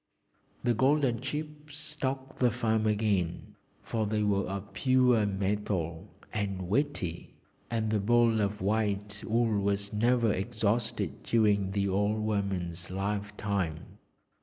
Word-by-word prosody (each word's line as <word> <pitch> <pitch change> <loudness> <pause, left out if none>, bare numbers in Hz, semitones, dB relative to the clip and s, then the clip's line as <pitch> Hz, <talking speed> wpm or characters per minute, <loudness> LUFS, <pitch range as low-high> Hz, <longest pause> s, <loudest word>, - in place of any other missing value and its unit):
The 120 -1 +3
golden 130 0 +2
chips 150 +1 -6
stocked 135 -3 -4
the 125 - +4
farm 110 -2 +1
again, 105 -5 0 0.3
for 110 -2 -1
they 105 0 0
were 100 -1 +1
of 100 +1 -5
pure 125 -1 +3
metal, 95 -4 -2 0.2
and 100 -3 -2
weighty, 100 - -1 0.3
and 110 -2 -1
the 110 - +2
ball 115 +1 +3
of 100 0 -1
white 105 0 -1
wool 110 -2 +1
was 100 +1 -1
never 115 0 +3
exhausted 105 - -1
during 105 -4 +2
the 100 -1 +1
old 100 +3 +1
woman's 95 -5 -2
life 100 +2 -3
time. 90 -7 -3
105 Hz, 125 wpm, -30 LUFS, 100-120 Hz, 0.3 s, the